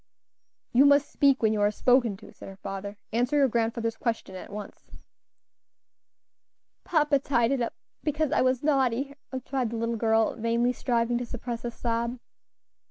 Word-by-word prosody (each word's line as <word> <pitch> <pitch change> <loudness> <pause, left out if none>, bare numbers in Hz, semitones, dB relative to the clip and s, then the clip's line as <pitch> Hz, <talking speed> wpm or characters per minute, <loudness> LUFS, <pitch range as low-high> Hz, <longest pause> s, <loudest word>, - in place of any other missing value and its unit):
"You 255 +3 +6
must 285 0 +4
speak 275 -4 +3
when 220 -1 +4
you 210 - 0
are 205 - +4
spoken 240 -1 +2
to," - - -14
said - - -11
her 195 - -10
father; 195 +1 -6 0.2
"answer 245 +5 +1
your 280 -2 +5
grandfather's 230 -1 -1
question 225 -5 -3
at 185 - -9
once." 210 0 -9 1.9
"Papa 300 -4 +2
tied 240 -3 +1
it 275 -2 0
up, 235 - -2 0.3
because 300 -1 -1
I - - +3
was 255 0 +1
naughty," 270 -2 +1 0.2
replied 260 -1 -2
the 230 - -4
little 230 0 -1
girl, 225 0 +2
vainly 235 +2 +1
striving 240 -1 0
to 245 - -3
suppress 240 0 -5
a 240 - -2
sob. 235 +1 -2
235 Hz, 165 wpm, -27 LUFS, 225-265 Hz, 1.9 s, You